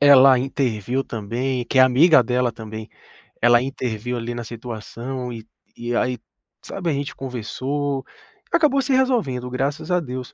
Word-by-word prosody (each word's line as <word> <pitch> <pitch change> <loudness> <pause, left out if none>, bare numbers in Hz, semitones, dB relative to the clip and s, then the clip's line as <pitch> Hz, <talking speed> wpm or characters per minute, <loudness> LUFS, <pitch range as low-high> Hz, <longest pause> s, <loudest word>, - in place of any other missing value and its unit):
ela 135 -2 +8
interviu 130 -1 -1
também 120 +4 -2
que 130 - 0
é - - +9
amiga 135 +3 +6
dela 125 +1 +1
também, 110 -1 -8 0.5
ela 120 0 +6
interviu, 125 -3 -3
ali, 120 +1 -4
na 120 - -4
situação, 120 +2 -6
e 110 -1 -9 0.3
e 120 0 -2
aí, 125 0 +1 0.5
sabe, 180 -4 -4
a - - +1
gente 140 0 -3
conversou. 135 +3 -3 0.5
Acabou 300 -5 +3
se 265 - -2
resolvendo 220 - +1
graças 140 +7 -2
a 180 - +3
Deus, 130 -4 -6
125 Hz, 150 wpm, -22 LUFS, 120-140 Hz, 0.5 s, é